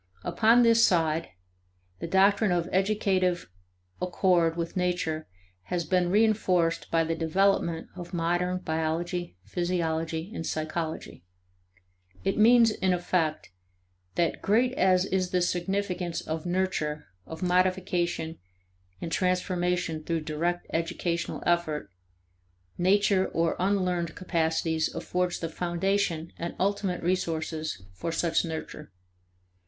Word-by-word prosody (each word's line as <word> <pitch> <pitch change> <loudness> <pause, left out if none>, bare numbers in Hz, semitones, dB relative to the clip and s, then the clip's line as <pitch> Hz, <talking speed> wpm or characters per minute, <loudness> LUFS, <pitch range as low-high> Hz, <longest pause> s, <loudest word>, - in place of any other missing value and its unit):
Upon 230 +2 +4
this 230 0 +5
side, 165 -4 +2 0.7
the - - -4
doctrine 195 +3 +4
of 175 -1 +1
educative 190 - +1 0.5
accord 175 -2 +2
with 165 -1 -3
nature 175 -4 -1 0.4
has 175 -2 -2
been 180 +2 +2
reinforced 190 -5 +2
by 165 0 +2
the 165 +1 -1
development 170 0 +1
of 175 -2 -8
modern 175 +1 0
biology, 165 - -2
physiology, 165 0 -2
and 165 - -4
psychology. 155 - -4 1.0
It 195 - 0
means, 230 +1 +6
in 190 -3 +1
effect, 175 - -1 0.6
that 170 -2 0
great 240 +5 +2
as 185 -4 +3
is 185 -2 0
the 180 - +1
significance 180 0 -1
of 160 +2 -4
nurture, 175 -5 -1 0.2
of 160 +2 -7
modification, 180 -2 0 0.6
and 165 - -4
transformation 180 -3 0
through 165 0 -1
direct 165 +3 -2
educational 170 +1 -2
effort, 155 - 0 0.8
nature, 190 +1 +3
or 165 0 0
unlearned 180 -3 0
capacities, 160 -2 0
affords 180 0 -1
the 165 - -2
foundation 175 0 -1
and 170 +1 -4
ultimate 195 -2 0
resources 160 - -2
for 130 - -4
such 165 0 +1
nurture. 160 - -6
175 Hz, 110 wpm, -28 LUFS, 165-185 Hz, 1.0 s, means